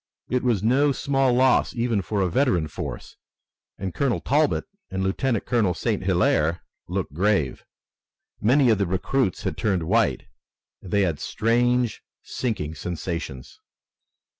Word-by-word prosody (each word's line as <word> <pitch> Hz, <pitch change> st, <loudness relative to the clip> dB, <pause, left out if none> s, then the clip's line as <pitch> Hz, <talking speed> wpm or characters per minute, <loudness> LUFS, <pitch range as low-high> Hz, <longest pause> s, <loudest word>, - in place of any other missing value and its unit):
It 125 Hz, 0 st, +2 dB
was 115 Hz, -6 st, +1 dB
no 135 Hz, +6 st, +3 dB
small 135 Hz, -1 st, +1 dB
loss 130 Hz, +1 st, +3 dB
even 115 Hz, -3 st, 0 dB
for 100 Hz, +2 st, -2 dB
a 95 Hz, -, +2 dB
veteran 90 Hz, -, +2 dB
force, -, -, -7 dB, 0.6 s
and 95 Hz, -2 st, -4 dB
Colonel 135 Hz, -5 st, 0 dB
Talbot 150 Hz, +2 st, +1 dB, 0.3 s
and 95 Hz, 0 st, -2 dB
Lieutenant 110 Hz, +4 st, 0 dB
Colonel 105 Hz, -8 st, +1 dB
St. -, -, -1 dB
Hilaire 80 Hz, +3 st, +1 dB, 0.2 s
looked -, -, -3 dB
grave. 90 Hz, -5 st, 0 dB, 0.8 s
Many 125 Hz, +3 st, +4 dB
of 110 Hz, -, +2 dB
the 100 Hz, -, +1 dB
recruits 95 Hz, +4 st, 0 dB
had -, -, -3 dB
turned 95 Hz, -6 st, 0 dB
white, 110 Hz, +6 st, +1 dB, 0.6 s
and 95 Hz, -, -10 dB
they 100 Hz, +3 st, +2 dB
had 85 Hz, -6 st, -1 dB
strange, 120 Hz, +1 st, +1 dB, 0.2 s
sinking 105 Hz, -, -3 dB
sensations. 85 Hz, -5 st, -5 dB
105 Hz, 140 wpm, -24 LUFS, 90-125 Hz, 0.8 s, Many